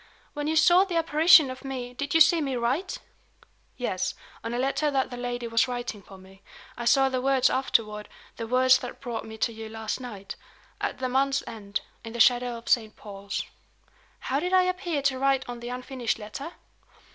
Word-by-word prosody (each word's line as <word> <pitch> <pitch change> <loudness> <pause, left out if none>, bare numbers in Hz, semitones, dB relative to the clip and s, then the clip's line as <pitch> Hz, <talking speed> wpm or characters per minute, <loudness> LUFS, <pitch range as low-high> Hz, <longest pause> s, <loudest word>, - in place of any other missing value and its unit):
When 295 -2 -3
you 315 - 0
saw 350 +4 +6
the 375 -3 -4
apparition 320 -2 +6
of 255 - -10
me, 255 -2 -5
did 285 +4 -3
you 325 - +5
see 325 +1 +6
me 270 -3 -2
write?" 255 +10 -1 0.8
"Yes. 185 -7 -2 0.3
On 230 - -4
a 240 - -2
letter 275 +4 0
that 270 -2 0
the - - -5
lady 245 -1 -4
was 230 +2 +2
writing 245 -4 -5
for 195 0 -14
me. 190 +1 -17 0.3
I 240 - -6
saw 270 +3 +5
the 260 -1 -1
words 265 -1 +3
afterward; 215 -5 0 0.3
the 230 - -5
words 255 +1 +5
that 250 - -8
brought 240 -4 -5
me 220 0 -9
to 230 - 0
you 220 0 -8
last 220 +1 -4
night: 205 -6 -8 0.5
'At - - -2
the 255 - -2
month's 270 +2 +1
end, 205 -3 -5 0.2
In 225 -1 -8
the 235 - -6
shadow 245 0 +4
of 230 - -13
Saint 220 -3 +2
Paul's.'" 200 -1 -6 0.8
"How 270 +2 -1
did 360 +4 -2
I 370 0 +6
appear 365 -5 -2
to 270 -2 +1
write 270 0 +1
on 245 -1 -6
the 240 +1 -7
unfinished 250 -1 -3
letter?" 230 +10 -7
250 Hz, 200 wpm, -26 LUFS, 230-275 Hz, 0.8 s, saw